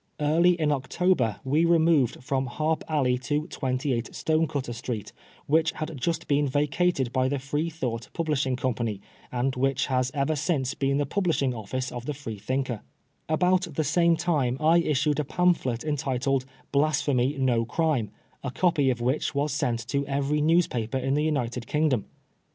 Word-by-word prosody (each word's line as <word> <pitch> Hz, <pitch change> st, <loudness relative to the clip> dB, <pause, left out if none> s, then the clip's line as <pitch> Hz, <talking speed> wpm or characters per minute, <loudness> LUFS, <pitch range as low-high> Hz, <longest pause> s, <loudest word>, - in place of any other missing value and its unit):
Early 170 Hz, +4 st, +3 dB
in 155 Hz, -2 st, +2 dB
October 135 Hz, -, +1 dB
we 145 Hz, +5 st, +2 dB
removed 160 Hz, -7 st, +3 dB
from 130 Hz, 0 st, -1 dB
Harp 155 Hz, +5 st, -1 dB
Alley 130 Hz, -5 st, +1 dB
to 145 Hz, +4 st, -1 dB
28 130 Hz, -5 st, -2 dB
Stone 160 Hz, 0 st, +1 dB
cutter 135 Hz, -4 st, -3 dB
Street, 115 Hz, -3 st, -5 dB, 0.3 s
which 160 Hz, +2 st, +2 dB
had 155 Hz, 0 st, -5 dB
just 165 Hz, +5 st, -2 dB
been 145 Hz, 0 st, +2 dB
vacated 145 Hz, -1 st, +1 dB
by 130 Hz, 0 st, +2 dB
the 140 Hz, -, 0 dB
Free 145 Hz, +5 st, -2 dB
thought 125 Hz, -8 st, -4 dB
Publishing 150 Hz, -6 st, 0 dB
Company, 120 Hz, -5 st, -2 dB, 0.3 s
and 125 Hz, +2 st, -1 dB
which 135 Hz, +2 st, +1 dB
has 130 Hz, 0 st, +2 dB
ever 140 Hz, +2 st, +1 dB
since 145 Hz, -3 st, 0 dB
been 140 Hz, 0 st, 0 dB
the 145 Hz, -, +1 dB
publishing 155 Hz, -5 st, 0 dB
office 125 Hz, +4 st, -4 dB
of 120 Hz, 0 st, -7 dB
the 150 Hz, -, -2 dB
Freethinker, 125 Hz, -1 st, -3 dB, 0.5 s
About 180 Hz, +3 st, +2 dB
the 155 Hz, -, +1 dB
same 170 Hz, +3 st, +3 dB
time 150 Hz, -7 st, 0 dB
I 160 Hz, +2 st, +5 dB
issued 150 Hz, -2 st, +1 dB
a -, -, +1 dB
pamphlet 145 Hz, -7 st, +1 dB
entitled 135 Hz, -3 st, 0 dB
" -, -, -31 dB
Blasphemy 145 Hz, -2 st, +1 dB
no 125 Hz, -4 st, +2 dB
Crime," 135 Hz, -3 st, 0 dB, 0.3 s
a 140 Hz, -, -2 dB
copy 155 Hz, -1 st, +2 dB
of 120 Hz, -2 st, -1 dB
which 130 Hz, +4 st, 0 dB
was 145 Hz, 0 st, 0 dB
sent 120 Hz, -5 st, -1 dB
to 140 Hz, 0 st, 0 dB
every 140 Hz, +2 st, 0 dB
news 165 Hz, +3 st, +4 dB
paper 120 Hz, +1 st, -3 dB
in 135 Hz, +1 st, 0 dB
the 150 Hz, +1 st, +1 dB
United 125 Hz, -6 st, -1 dB
Kingdom. 150 Hz, -8 st, +1 dB
140 Hz, 170 wpm, -26 LUFS, 130-155 Hz, 0.5 s, I